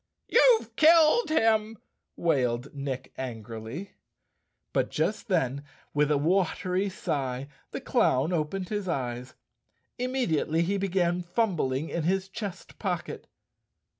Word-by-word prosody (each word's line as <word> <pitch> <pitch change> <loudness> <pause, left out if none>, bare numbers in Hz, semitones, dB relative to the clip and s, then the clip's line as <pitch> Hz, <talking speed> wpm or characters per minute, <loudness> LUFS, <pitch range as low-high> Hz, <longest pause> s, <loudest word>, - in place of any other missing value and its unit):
" - - -54
You've 485 -2 +5
killed 325 +6 +6
him," 225 -6 +2 0.4
wailed 130 -5 0
Nick 135 -2 -5
angrily. 115 - -6 0.8
But - - +1
just 215 +2 -1
then, 140 - 0 0.3
with 150 0 +2
a 150 - +3
watery 185 +4 +1
sigh, 135 -7 -3 0.2
the - - -5
clown 140 +8 +2
opened 175 +3 -2
his 205 -2 -2
eyes. 125 -5 -3 0.6
Immediately 185 - +1
he 200 +4 0
began 180 -2 +1
fumbling 170 - 0
in 170 - -2
his 190 +4 0
chest 195 -2 -7
pocket. - - -3
170 Hz, 115 wpm, -28 LUFS, 135-200 Hz, 0.8 s, killed